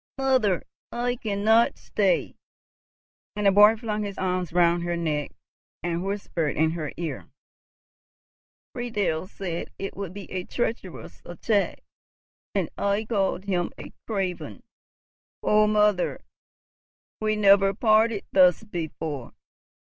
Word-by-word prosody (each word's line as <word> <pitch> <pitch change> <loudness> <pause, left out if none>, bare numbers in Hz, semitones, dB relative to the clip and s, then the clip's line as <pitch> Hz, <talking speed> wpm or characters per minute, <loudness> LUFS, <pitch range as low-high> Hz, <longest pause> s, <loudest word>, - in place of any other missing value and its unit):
"Mother, 260 -9 +2 0.3
I 245 +1 -1
cannot 220 +2 +2
stay!" - - 0 1.0
and 210 0 -2
the 195 - +7
boy 210 +3 +7
flung 215 -2 -3
his 200 -2 -5
arms 185 -2 -1
round 170 0 +3
her 175 0 -2
neck, 150 -3 -1 0.5
and 170 0 -1
whispered 195 -6 -2
in 160 0 +3
her 155 -3 -4
ear, 160 -6 -5 1.4
"Friedel 205 -9 -2
said 180 -4 -5
it 195 - -5
would 195 -3 -5
be 200 +1 -8
a 185 -1 -3
treacherous 225 -4 -4
attack, 200 +4 -1 0.7
and - - +1
I 200 +2 0
called 195 -3 -1
him 180 -3 0
a - - -10
craven. 195 -5 -3 0.8
Oh, 210 0 +4
mother, 210 -3 +2 1.0
we 215 0 0
never 200 -1 +5
parted 215 0 +2
thus 185 0 +5
before! 160 - -5
195 Hz, 120 wpm, -25 LUFS, 175-215 Hz, 1.4 s, the